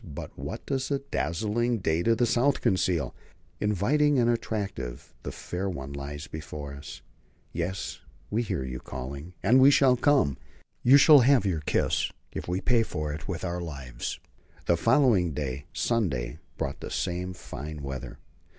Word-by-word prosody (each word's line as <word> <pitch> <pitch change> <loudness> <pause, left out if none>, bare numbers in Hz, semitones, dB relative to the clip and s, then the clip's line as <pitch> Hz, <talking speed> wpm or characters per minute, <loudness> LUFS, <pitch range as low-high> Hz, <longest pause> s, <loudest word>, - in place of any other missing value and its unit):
But 75 -8 -7
what - - -6
does 135 -2 -1
the 140 - +2
dazzling 110 +9 0
day 80 -4 +1
to 115 +5 +3
the 120 +2 +2
south 125 +4 +2
conceal? 90 -8 +1 0.5
Inviting 135 - +2
and 120 -1 +4
attractive 100 - -4
the - - -5
fair 95 +2 -4
one 70 -6 -6
lies 70 +1 -6
before 75 -2 -7
us. 70 +1 -9 0.5
Yes, 90 +3 -3 0.3
we 110 - +1
hear 100 - -2
you 65 -1 -5
calling, 70 +8 -7
and 120 +7 +6
we 135 - +9
shall 135 -2 +5
come. 125 - +3 0.4
You 130 +3 +7
shall 145 +1 +9
have 130 -3 +5
your 85 -5 0
kiss, - - +1 0.2
if - - -5
we 90 +2 -1
pay 120 -2 +3
for 75 -8 -3
it 75 - -7
with 95 -1 -3
our 90 0 -2
lives. 70 -7 -5 0.5
The 85 - +4
following 110 - +3
day 70 -1 -3
Sunday 75 - -1 0.2
brought - - -3
the - - -6
same 90 +1 -2
fine 75 -1 -7
weather. 70 -2 -6
90 Hz, 160 wpm, -28 LUFS, 75-120 Hz, 0.5 s, we